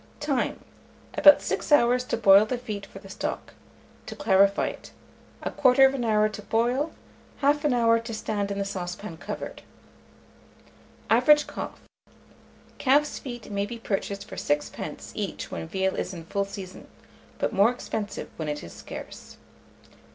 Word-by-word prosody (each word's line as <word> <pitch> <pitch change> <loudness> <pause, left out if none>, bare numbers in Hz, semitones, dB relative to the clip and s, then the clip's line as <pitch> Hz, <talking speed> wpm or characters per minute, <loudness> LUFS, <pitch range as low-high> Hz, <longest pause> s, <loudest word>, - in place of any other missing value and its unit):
Time. 290 -4 -1 0.5
About 290 -1 +7
6 - - -3
hours 250 -3 +5
to - - -1
boil 200 -1 +7
the 250 - -1
feet 210 -5 -6
for - - -12
the 195 - -12
stock; 195 - -5 0.5
to - - -6
clarify 200 -6 +3
it, - - -10 0.6
1/4 265 0 +4
hour 215 -2 +3
to 210 0 -7
boil, 245 +9 0 0.5
1/2 295 +1 +3
hour 230 -2 +4
to 230 +1 -7
stand 210 -2 -2
in 200 - -3
the 200 - -1
saucepan 180 -1 -5
covered. - - -6 1.5
Average 295 +6 +6
cost. - - -7 1.0
Calf's 290 +3 +2
feet 240 -5 -8
may 200 0 -1
be 235 - -6
purchased 200 -2 -3
for - - -9
6d. 145 0 -3
each - - -5
when 80 -1 -5
veal 190 0 -1
is 185 - -3
in 165 -2 -9
full 200 +3 -1
season, 195 -2 -9 0.5
but - - -1
more 200 +3 +5
expensive 220 -4 -4
when 155 -2 -3
it 150 0 -4
is 85 - -10
scarce. - - -10
215 Hz, 145 wpm, -26 LUFS, 195-250 Hz, 1.5 s, About